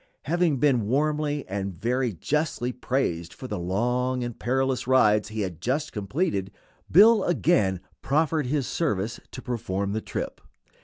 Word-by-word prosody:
Having 165 -1 +1
been 125 -6 +2
warmly 150 +2 0
and 95 -2 -4
very 125 +3 0
justly 130 - -1
praised 125 -10 -2
for 130 - -8
the 105 -5 -4
long 125 +8 0
and 120 -2 -6
perilous 130 +1 0
rides 105 -5 +4
he 110 0 -3
had 90 -4 -4
just 140 - -1
completed, 105 - -1 0.4
Bill 210 +4 +7
again 105 - +2 0.2
proffered 150 0 +1
his 140 0 0
service 115 - -1
to 130 - -9
perform 100 -6 -2
the 110 - -1
trip. - - -5
125 Hz, 145 wpm, -26 LUFS, 105-145 Hz, 0.4 s, Bill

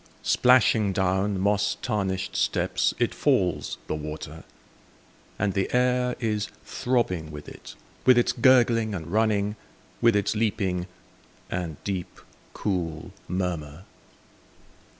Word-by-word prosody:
Splashing 115 -5 +4
down 95 +1 0
moss 105 +1 +1
tarnished 95 -5 -2
steps - - +1
It - - 0
falls, - - +1
the - - -3
water; 75 +1 -6 0.9
And 100 -1 0
the 95 0 -1
air 125 0 +2
is 105 -3 -1 0.2
throbbing 95 -11 -1
with 75 -1 -9
it. - - -11 0.3
With 130 -1 +6
its 120 - +3
gurgling 115 -3 +4
and 80 -4 -5
running. 105 -1 +1 0.4
With 115 -2 +5
its 105 +1 +1
leaping, 95 -5 0 0.6
and 85 -4 -3
deep, 95 -3 -4 0.3
cool 85 -6 -3 0.2
murmur. 85 -3 -3
100 Hz, 110 wpm, -26 LUFS, 90-110 Hz, 0.9 s, With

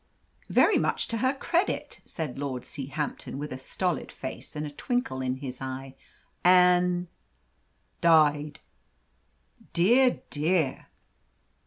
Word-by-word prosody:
"Very - - +4
much - - 0
to 230 - -1
her 260 +4 +1
credit," 345 +7 -1
said 150 -6 -5
Lord 135 -3 -3
Seahampton, 140 0 -5
with 150 0 -5
a 130 - -7
stolid 175 +3 -2
face 130 - -8
and 150 0 -3
a 145 - -6
twinkle 245 - -2
in 130 0 -1
his 130 -1 -7
eye. 130 0 -5 0.5
"And 180 0 +5 0.5
" 65 -1 -43
"Died." 150 -3 +3 1.1
"Dear, 240 +9 +4
dear!" 155 -2 0
150 Hz, 120 wpm, -27 LUFS, 135-180 Hz, 1.1 s, And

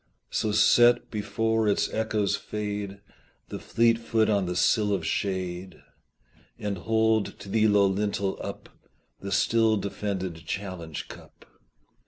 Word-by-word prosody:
So 110 - 0
set, 120 +3 +4
before 110 +1 0
its 100 - +2
echoes 110 -2 0
fade, 105 -1 -5 0.5
The - - -5
fleet 115 0 +2
foot 110 -1 +1
on 100 -3 +1
the 90 - -3
sill 105 +3 +2
of 90 -5 -2
shade, 95 -1 -3 0.8
And 100 -3 -3
hold 110 +1 +1
to - - -11
the 110 +1 +3
low 105 -1 +4
lintel 100 0 -1
up - - -7 0.5
The 100 - -6
still 110 +2 +3
defended 95 -3 -3
challenge 90 -5 -5
cup. - - -14
105 Hz, 130 wpm, -26 LUFS, 95-110 Hz, 0.8 s, set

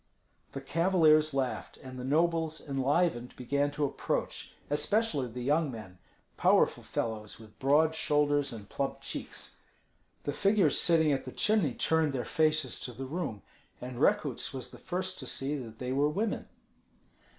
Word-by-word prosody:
The 135 - -5
cavaliers 155 0 +4
laughed, 135 -2 -2
and 130 -1 -9
the - - -5
nobles, 160 +3 +1
enlivened, 135 -1 0
began 140 +3 0
to 145 0 0
approach, 140 - -3
especially 150 - +1
the 120 +1 -6
young 150 +3 +2
men, 95 -6 -10 0.4
powerful - - +3
fellows 110 -2 -4
with 110 -1 -16
broad 150 +4 +4
shoulders 145 -2 +2
and 105 -4 -9
plump 140 +4 -3
cheeks. - - -6 0.7
The 145 - -2
figures 200 0 +3
sitting 160 -3 +4
at 135 -2 -1
the 130 - -6
chimney 205 - +1
turned 160 -3 +1
their 125 -2 -2
faces 155 -4 +1
to 125 - -5
the 135 +4 -6
room, 135 - -4 0.4
and 125 -1 -7
Rekuts 155 - +1
was 130 - -5
the - - -12
first 185 0 -3
to 130 - -6
see 135 +4 -1
that 115 -5 -7
they 125 +1 -4
were 140 +3 +2
women. 205 +8 -2
145 Hz, 155 wpm, -30 LUFS, 130-160 Hz, 0.7 s, cavaliers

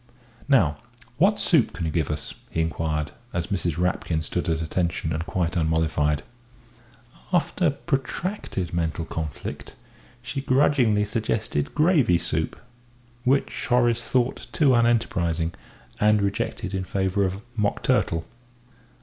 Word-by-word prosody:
"Now, 85 - +4 0.4
what 195 +7 +4
soup 160 - +3
can 85 - -3
you 80 - -1
give 80 -2 0
us?" 75 -1 -4 0.2
he - - -3
inquired, 80 -2 -1 0.2
as 85 -1 -1
Mrs. 85 -4 -1
Rapkin 90 -2 0
stood 80 - -2
at 80 -1 +1
attention 80 0 -1
and 80 +1 -2
quite 85 -2 -1
unmollified. 80 -2 +1 1.1
After 175 0 +2
protracted 135 - -3
mental 85 -1 -1
conflict, 80 -5 -6 0.5
she 135 +2 -3
grudgingly 130 -6 +3
suggested 105 - -1
gravy 150 - +4
soup 80 -1 -1 0.7
which 135 +2 +1
Horace 120 -1 +3
thought 125 -1 0
too 140 -2 +4
unenterprising, 90 -9 +1 0.5
and 105 0 +4
rejected 100 -1 -2
in 95 -1 -1
favour 95 +1 0
of 95 0 -1 0.2
mock 105 -2 0
turtle. 80 0 +1
95 Hz, 125 wpm, -25 LUFS, 80-125 Hz, 1.1 s, Now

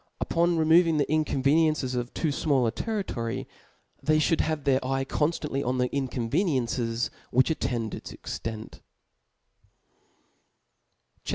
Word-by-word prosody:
Upon 170 0 +1
removing 165 +1 +4
the 145 - +2
incon 150 -3 0
veniencies 150 -2 +3
of 120 0 -3
too 160 - 0
fmall 140 -4 +1
a - - +1
territory, 190 - -3 0.5
they 155 0 +3
fliould 155 +1 +2
have 155 -2 -2
their 135 -1 +2
eye 135 +1 -1
conftantly 150 -1 -1
on 125 +1 -1
the 125 0 +1
incoftvenicncic^ 125 - -1 0.2
which 130 +6 +3
attend 120 -8 -2
its - - -7
extent* 110 -1 -7 2.4
CHAP. - - -7
140 Hz, 125 wpm, -27 LUFS, 125-155 Hz, 2.4 s, removing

